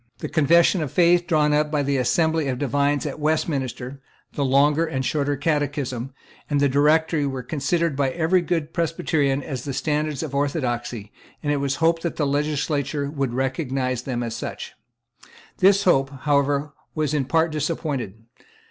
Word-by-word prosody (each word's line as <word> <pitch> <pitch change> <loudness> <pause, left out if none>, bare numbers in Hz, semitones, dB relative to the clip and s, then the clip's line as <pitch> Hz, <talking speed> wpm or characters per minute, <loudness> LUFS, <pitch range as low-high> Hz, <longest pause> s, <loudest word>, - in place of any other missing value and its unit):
The - - -5
Confession 170 +3 +4
of 150 - -3
Faith 175 0 +3
drawn 150 -3 +2
up 150 0 +2
by 150 -2 0
the 140 0 0
Assembly 160 +3 +1
of 130 -2 -1
Divines 145 +2 0
at 145 +1 -5
Westminster, 140 -4 -2 0.3
the 145 - -1
Longer 145 +4 +3
and 135 -5 -2
Shorter 145 0 0
Catechism, 140 -4 -2 0.4
and 145 -1 +1
the 140 - +4
Directory, 150 +2 +2
were 135 -2 -4
considered 155 +4 -1
by 135 -1 +1
every 170 +5 +2
good 165 -2 -2
Presbyterian 150 -4 0
as 130 -4 -5
the 140 - -4
standards 150 -1 -1
of 150 -3 -6
orthodoxy; 120 -7 -2 0.3
and 145 - 0
it - - 0
was 140 -1 -1
hoped 165 +1 +2
that 170 - -3
the 150 - 0
legislature 145 0 -1
would 135 -5 -2
recognise 130 -2 -1
them 125 -2 -3
as 115 -1 -4
such, - - -6 0.9
This 195 +1 +5
hope, 135 -8 +3
however, 145 0 +1 0.2
was 155 -2 -1
in 145 -3 0
part 160 +3 +1
disappointed. 150 - -3
145 Hz, 165 wpm, -23 LUFS, 135-160 Hz, 0.9 s, This